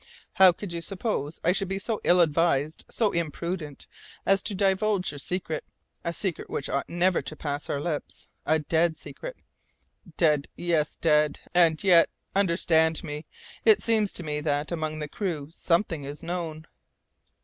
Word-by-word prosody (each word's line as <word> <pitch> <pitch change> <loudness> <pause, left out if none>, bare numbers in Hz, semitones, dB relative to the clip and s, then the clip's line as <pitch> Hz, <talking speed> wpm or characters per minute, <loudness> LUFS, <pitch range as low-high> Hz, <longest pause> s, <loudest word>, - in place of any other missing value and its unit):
"How 190 -1 +8
could 175 +1 -7
you 170 - -3
suppose 180 - -3
I 175 - +4
should 195 +1 0
be 195 +1 -2
so 215 +2 -3
ill 180 0 +5
advised, 155 -2 +1
so 220 -4 +1
imprudent, 170 -2 -3 0.4
as 195 -1 +4
to 200 - -2
divulge 195 0 +1
your 145 - -8
secret, 170 0 -3 0.4
a 170 - -1
secret 180 0 -3
which 135 - -3
ought 140 - -2
never 175 +1 +2
to 155 - -6
pass 145 -1 -4
our 140 - -1
lips 150 0 -4 0.2
a 155 - +3
dead 160 +2 +1
secret?" - - -8 0.8
"Dead, 150 -4 +3
yes, 165 -3 0
dead! 150 -2 +2
And 170 -1 +4
yet, 175 -4 +6 0.3
understand 170 -4 +2
me, 150 -1 -6 0.4
it 435 -1 +5
seems 220 -3 +2
to 175 - -4
me 150 -1 -2
that, 150 0 -1
among 155 -2 -2
the 150 -1 -4
crew, 160 -4 -4
something 170 -2 0
is 145 +3 -7
known." 165 -2 -4
170 Hz, 160 wpm, -27 LUFS, 150-185 Hz, 0.8 s, How